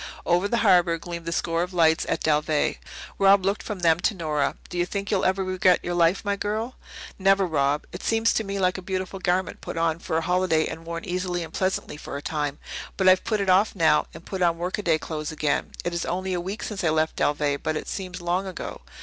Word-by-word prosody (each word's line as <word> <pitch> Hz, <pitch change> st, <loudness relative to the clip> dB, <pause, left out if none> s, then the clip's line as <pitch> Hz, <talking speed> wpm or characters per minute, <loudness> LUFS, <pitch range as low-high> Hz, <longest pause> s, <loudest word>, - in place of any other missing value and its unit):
Over 175 Hz, +3 st, +2 dB
the 235 Hz, -, 0 dB
harbour 175 Hz, -3 st, +5 dB
gleamed 170 Hz, 0 st, -7 dB
the -, -, -1 dB
score 165 Hz, 0 st, 0 dB
of 180 Hz, +1 st, -4 dB
lights 160 Hz, -2 st, +3 dB
at -, -, -1 dB
Dalveigh. 150 Hz, 0 st, +1 dB, 0.4 s
Rob 195 Hz, -1 st, +5 dB
looked 200 Hz, +2 st, 0 dB
from 205 Hz, -4 st, -6 dB
them 165 Hz, -1 st, +4 dB
to 205 Hz, -, +1 dB
Nora. 155 Hz, -5 st, -1 dB
"Do 175 Hz, -, -4 dB
you 175 Hz, -, +2 dB
think 200 Hz, 0 st, -4 dB
you'll 200 Hz, -, +1 dB
ever 190 Hz, +1 st, +2 dB
regret 185 Hz, -1 st, +3 dB
yon 175 Hz, -, -2 dB
life, 175 Hz, +4 st, +2 dB
my 200 Hz, 0 st, +1 dB
girl?" 215 Hz, +5 st, -2 dB, 0.5 s
"Never, 195 Hz, 0 st, +4 dB
Rob. 145 Hz, -3 st, +1 dB
It 180 Hz, -, -7 dB
seems 225 Hz, 0 st, +2 dB
to 220 Hz, -, 0 dB
me 200 Hz, -1 st, -4 dB
now 195 Hz, -, -2 dB
like 185 Hz, 0 st, +1 dB
a -, -, -8 dB
beautiful 190 Hz, +1 st, -4 dB
garment 185 Hz, +1 st, -1 dB
put -, -, -6 dB
on 165 Hz, 0 st, +1 dB
for 160 Hz, -, -2 dB
a -, -, +1 dB
holiday 180 Hz, -2 st, +2 dB
and 165 Hz, +1 st, -7 dB
worn 170 Hz, 0 st, -5 dB
easily 180 Hz, -1 st, -2 dB
and 165 Hz, -, -10 dB
pleasantly 185 Hz, -5 st, -1 dB
for 140 Hz, -, -6 dB
a -, -, -6 dB
time. 145 Hz, -2 st, -2 dB, 0.4 s
But 190 Hz, -, +2 dB
I've 185 Hz, 0 st, +5 dB
put 215 Hz, -3 st, 0 dB
it 200 Hz, -, -1 dB
off 190 Hz, +4 st, +4 dB
now, 165 Hz, -4 st, +3 dB
and 170 Hz, -, -11 dB
put 190 Hz, -2 st, -5 dB
on 170 Hz, -1 st, +3 dB
workaday 175 Hz, -1 st, 0 dB
clothes 155 Hz, -1 st, -5 dB
again. 155 Hz, -2 st, -1 dB, 0.2 s
It 175 Hz, -, -1 dB
is 170 Hz, -, -1 dB
only 185 Hz, +2 st, -2 dB
a 175 Hz, -, -1 dB
week 195 Hz, +5 st, -5 dB
since 205 Hz, -4 st, -4 dB
I 165 Hz, -, +3 dB
left 155 Hz, 0 st, 0 dB
Dalveigh, 145 Hz, -1 st, +1 dB
but 155 Hz, 0 st, -2 dB
it -, -, -6 dB
seems 185 Hz, -2 st, -5 dB
long 180 Hz, +3 st, 0 dB
ago. 185 Hz, -, -6 dB
180 Hz, 240 wpm, -25 LUFS, 165-190 Hz, 0.5 s, harbour